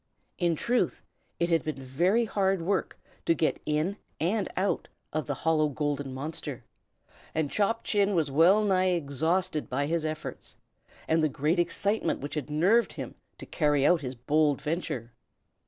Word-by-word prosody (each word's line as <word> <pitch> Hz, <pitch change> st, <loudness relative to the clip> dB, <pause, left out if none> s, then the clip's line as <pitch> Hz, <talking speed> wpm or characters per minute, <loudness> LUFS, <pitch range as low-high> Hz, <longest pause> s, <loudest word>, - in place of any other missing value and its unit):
In 170 Hz, -2 st, +2 dB
truth, 245 Hz, +10 st, 0 dB, 0.4 s
it 170 Hz, 0 st, +1 dB
had 165 Hz, -, +3 dB
been 155 Hz, -, -3 dB
very 175 Hz, -, +1 dB
hard 195 Hz, -4 st, +1 dB
work 190 Hz, +1 st, -1 dB, 0.3 s
to 165 Hz, -, +3 dB
get 160 Hz, -, 0 dB
in 155 Hz, +7 st, 0 dB, 0.2 s
and 190 Hz, +5 st, 0 dB
out 195 Hz, +2 st, 0 dB, 0.3 s
of 155 Hz, -4 st, -2 dB
the -, -, -1 dB
hollow 155 Hz, -2 st, +2 dB
golden 145 Hz, -1 st, -2 dB
monster, 145 Hz, +5 st, -5 dB, 0.7 s
and 155 Hz, -3 st, 0 dB
Chop 220 Hz, +2 st, +1 dB
Chin 205 Hz, -1 st, +2 dB
was 155 Hz, -5 st, +1 dB
well 175 Hz, +9 st, +5 dB
nigh 185 Hz, -2 st, +3 dB
exhausted 160 Hz, +2 st, 0 dB
by 140 Hz, +3 st, 0 dB
his 165 Hz, +2 st, 0 dB
efforts, 155 Hz, 0 st, -5 dB, 0.5 s
and 160 Hz, 0 st, +3 dB
the 155 Hz, -, +2 dB
great 150 Hz, +6 st, 0 dB
excitement 200 Hz, +5 st, +1 dB
which 145 Hz, -, -6 dB
had 150 Hz, -2 st, -3 dB
nerved 190 Hz, +11 st, +3 dB
him -, -, -6 dB, 0.2 s
to -, -, -9 dB
carry 145 Hz, -3 st, +2 dB
out 175 Hz, 0 st, +4 dB
his 130 Hz, -2 st, -5 dB
bold 145 Hz, +3 st, +2 dB
venture. 140 Hz, -6 st, -3 dB
160 Hz, 160 wpm, -28 LUFS, 145-185 Hz, 0.7 s, well